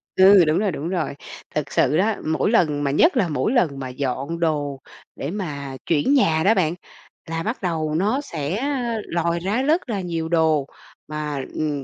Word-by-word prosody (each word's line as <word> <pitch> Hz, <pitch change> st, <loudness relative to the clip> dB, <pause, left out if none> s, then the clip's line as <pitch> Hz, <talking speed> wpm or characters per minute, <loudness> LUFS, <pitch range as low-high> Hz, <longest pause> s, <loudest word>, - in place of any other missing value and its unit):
Ừ, 190 Hz, -2 st, +7 dB
đúng 155 Hz, +4 st, +2 dB
rồi, 205 Hz, -3 st, +1 dB
đúng 160 Hz, +3 st, -4 dB
rồi. 175 Hz, -6 st, -2 dB, 0.4 s
Thực 150 Hz, -2 st, -2 dB
sự 145 Hz, +4 st, +2 dB
đó, 210 Hz, +3 st, +2 dB
mỗi 160 Hz, +7 st, +1 dB
lần 150 Hz, -10 st, +2 dB
mà 140 Hz, -, +1 dB
nhất 260 Hz, -, +4 dB
là 195 Hz, -, +3 dB
mỗi 155 Hz, +9 st, 0 dB
lần 160 Hz, -, +1 dB
mà 130 Hz, -1 st, -5 dB
dọn 135 Hz, +5 st, -3 dB
đồ 145 Hz, -4 st, -1 dB, 0.4 s
để 145 Hz, -, -4 dB
mà 145 Hz, -9 st, -5 dB
chuyển 165 Hz, -, +2 dB
nhà 160 Hz, -, +3 dB
đó 210 Hz, +4 st, +5 dB
bạn, 170 Hz, -5 st, +1 dB, 0.6 s
là 165 Hz, 0 st, -2 dB
bắt 230 Hz, +4 st, -3 dB
đầu 160 Hz, -4 st, -1 dB
nó 215 Hz, -, +1 dB
sẽ 170 Hz, -, -3 dB, 0.4 s
lòi 170 Hz, 0 st, -1 dB
ra 200 Hz, +8 st, -1 dB
rất 300 Hz, +1 st, +1 dB
là 205 Hz, -4 st, -1 dB
nhiều 165 Hz, -2 st, -3 dB
đồ, 160 Hz, -4 st, +2 dB, 0.4 s
mà, 150 Hz, -3 st, -4 dB
ừm, 150 Hz, -3 st, -2 dB
165 Hz, 190 wpm, -22 LUFS, 145-195 Hz, 0.6 s, Ừ